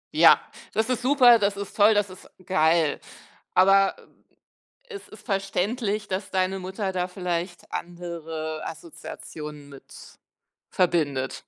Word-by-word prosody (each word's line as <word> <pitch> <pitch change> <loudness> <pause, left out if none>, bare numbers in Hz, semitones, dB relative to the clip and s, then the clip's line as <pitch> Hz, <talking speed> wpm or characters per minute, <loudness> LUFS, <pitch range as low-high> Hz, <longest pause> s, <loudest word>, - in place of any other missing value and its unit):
Ja, - - +7 0.3
das 220 +3 0
ist 250 -1 0
super, 250 -3 +6
das 200 0 0
ist 200 - -7
toll, 210 +1 +5
das 205 -2 +1
ist 185 - -14 0.2
geil. 160 -3 +2 0.6
Aber, 195 +1 +5
äh, - - -17 0.9
es 405 -3 -9
ist 215 -1 -15
verständlich, 205 +2 -1
dass 190 +1 -4
deine 190 0 0
Mutter 190 +1 -4
da 180 0 -1
vielleicht 180 -1 -4
andere 165 -3 -5
Assoziationen 150 -2 -9
mit 140 -1 -13 0.9
verbindet. 145 -7 0
185 Hz, 125 wpm, -25 LUFS, 165-205 Hz, 0.9 s, Ja